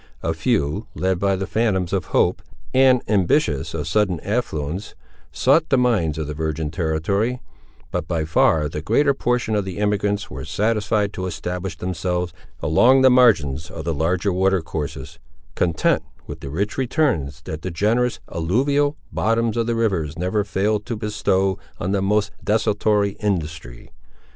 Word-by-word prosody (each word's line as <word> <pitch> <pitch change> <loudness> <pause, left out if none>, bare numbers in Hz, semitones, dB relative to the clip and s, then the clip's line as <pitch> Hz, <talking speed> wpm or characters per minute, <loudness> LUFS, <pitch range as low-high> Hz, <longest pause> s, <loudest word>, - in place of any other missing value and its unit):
A 80 - 0
few, 100 - 0
led 95 -1 0
by 100 0 +2
the 95 +1 -3
phantoms 95 -5 0
of 95 - 0
hope, - - +1 0.3
and 130 -1 +5
ambitious 90 - +1
of 75 -2 -3
sudden 95 -1 +1
affluence, 95 -5 -3 0.4
sought 155 +5 +3
the 135 - +4
mines 105 -12 +1
of 80 - -2
the 75 - -5
virgin 80 0 -3
territory; 90 +9 -1 0.5
but - - -2
by 80 -3 -1
far 80 -1 +3
the 75 0 -5
greater 140 - +3
portion 120 -4 0
of 105 -1 +1
the 95 -2 -6
emigrants 105 0 0
were 65 +1 -7
satisfied 105 +5 0
to 95 0 -3
establish 90 +2 -4
themselves 90 0 -2 0.3
along 125 - +5
the 130 - +7
margins 85 - +3
of 80 -2 -7
the 85 - 0
larger 90 +5 0
water 95 +1 +2
courses, 75 -2 -6 0.3
content 85 -3 +1 0.2
with - - -8
the 70 - -7
rich 100 - -2
returns 115 - 0
that 80 +1 -6
the 95 - -4
generous, 110 +8 +1
alluvial, 140 - +1
bottoms 115 +1 +1
of 115 -1 0
the 120 - 0
rivers 90 -10 -1
never 95 +4 0
fail 105 +2 0
to 110 +3 -5
bestow 95 -3 0 0.2
on 95 - -2
the 100 -1 +1
most 100 +1 +1
desultory 105 -1 +2
industry. 80 - -3
95 Hz, 160 wpm, -22 LUFS, 80-110 Hz, 0.5 s, the